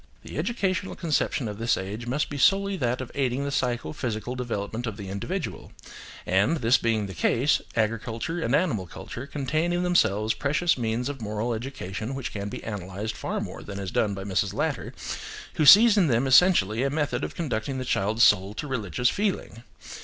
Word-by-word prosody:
The - - -6
educational 195 -5 -1
conception 150 -6 0
of 105 0 -6
this 115 +1 +2
age 105 +5 -5
must 140 +5 0
be 145 - -4
solely 200 +6 +3
that 125 -3 -1
of 125 - -7
aiding 135 -1 0
the 140 - -2
psycho 125 -1 -1
physical 120 -4 -3
development 120 -2 -3
of 110 -2 -5
the 100 -3 -7
individual; 160 - -4 0.5
and, 100 - +2
this 120 -2 +3
being 110 -3 +1
the 95 - -7
case, 120 - +2
agriculture 115 +8 -1
and 120 0 +1
animal 135 - 0
culture 120 +9 -8
contain 155 +4 -1
in 175 0 0
themselves 110 - +2
precious 150 +4 +1
means 120 0 -1
of 140 -3 -5
moral 110 +2 -2
education 115 -1 -5
which 135 -2 -4
can 100 -1 -4
be - - -7
analysed 100 +1 -5
far - - -3
more - - -6
than 100 -1 -7
is 95 -2 -4
done 105 -3 +1
by 95 - -6
Mrs. 95 -2 -1
Latter, - - -2 0.6
who 155 - +2
sees 215 +4 +9
in 185 -5 +4
them 120 0 +2
essentially 130 - +5
a 140 - +1
method 150 0 -1
of - - -4
conducting 130 -4 -2
the 130 - -3
child's 110 +1 +1
soul 100 0 +4
to 150 - -4
religious 125 - 0
feeling. 195 - -2
120 Hz, 190 wpm, -26 LUFS, 105-145 Hz, 0.6 s, sees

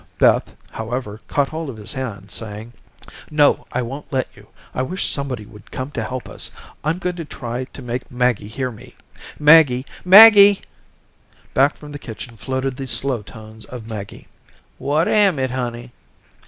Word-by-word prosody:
Beth, - - +3 0.2
however, 110 -1 -5
caught 140 -1 +1
hold 160 -1 -5
of 120 - -8
his 105 - -8
hand, 105 -7 -6
saying: 110 +1 -6 0.6
"No, 150 -1 +3
I 125 - -1
won't 135 +5 -7
let 130 -2 0
you. - - -17 0.3
I - - -1
wish 180 +9 -2
somebody 130 -6 -3
would 105 -1 -15
come 130 +2 -5
to 115 - -3
help 125 +2 -5
us. - - -5 0.3
I'm 155 +3 0
going 180 -1 -3
to 165 - -4
try 125 -2 -5
to 135 - -12
make 125 +1 -4
Maggie 125 -4 0
hear 125 +4 -3
me. 110 - -14 0.4
Maggie. 150 -4 +6 0.2
Maggie." 205 +1 +9 0.9
Back 135 +2 +3
from 150 -1 -11
the 145 - -7
kitchen 115 0 -9
floated 130 +2 -3
the 135 - -5
slow 130 -2 0
tones 110 0 -12
of 120 -3 -9
Maggie. 105 -3 -8 0.5
"What 150 +4 +1
am 200 -6 +4
it, 130 -1 -1
honey?" 120 -1 -4
130 Hz, 170 wpm, -20 LUFS, 115-145 Hz, 0.9 s, Maggie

